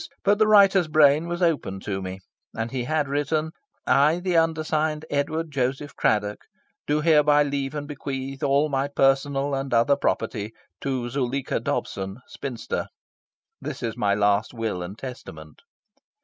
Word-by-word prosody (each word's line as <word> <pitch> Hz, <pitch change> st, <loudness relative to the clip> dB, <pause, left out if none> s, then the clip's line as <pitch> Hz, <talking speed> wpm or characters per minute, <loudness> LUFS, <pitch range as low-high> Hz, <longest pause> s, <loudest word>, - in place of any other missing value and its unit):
But 205 Hz, +1 st, +3 dB
the 215 Hz, -, +5 dB
writer's 195 Hz, -4 st, +6 dB
brain 155 Hz, +1 st, +4 dB
was 175 Hz, +1 st, -2 dB
open 145 Hz, -, 0 dB
to 95 Hz, -1 st, -3 dB
me; 95 Hz, 0 st, -6 dB, 0.4 s
and 115 Hz, +1 st, -3 dB
he 125 Hz, -2 st, -3 dB
had 155 Hz, 0 st, 0 dB
written 145 Hz, +3 st, -1 dB, 0.3 s
"I, 150 Hz, +5 st, +4 dB
the 180 Hz, -1 st, -1 dB
undersigned 155 Hz, -1 st, +1 dB
Edward 155 Hz, +3 st, -1 dB
Joseph 135 Hz, +2 st, -2 dB
Craddock, 105 Hz, -1 st, +1 dB, 0.5 s
do 150 Hz, +1 st, +1 dB
hereby 150 Hz, -2 st, +5 dB
leave 140 Hz, 0 st, -3 dB
and 145 Hz, -1 st, -4 dB
bequeath 135 Hz, -1 st, -5 dB
all 140 Hz, +1 st, +3 dB
my 135 Hz, -1 st, 0 dB
personal 135 Hz, 0 st, +1 dB
and 135 Hz, 0 st, -2 dB
other 120 Hz, +5 st, +4 dB
property 110 Hz, -5 st, -2 dB, 0.3 s
to 130 Hz, -3 st, -2 dB
Zuleika 130 Hz, +1 st, -2 dB
Dobson, 95 Hz, +1 st, -3 dB
spinster. 125 Hz, -5 st, -5 dB, 0.7 s
This -, -, -6 dB
is 115 Hz, -1 st, -2 dB
my 105 Hz, -4 st, +1 dB
last 105 Hz, +3 st, +1 dB
will 110 Hz, -5 st, -2 dB
and 90 Hz, +4 st, -7 dB
testament." 80 Hz, -, -9 dB
140 Hz, 150 wpm, -24 LUFS, 120-155 Hz, 0.7 s, writer's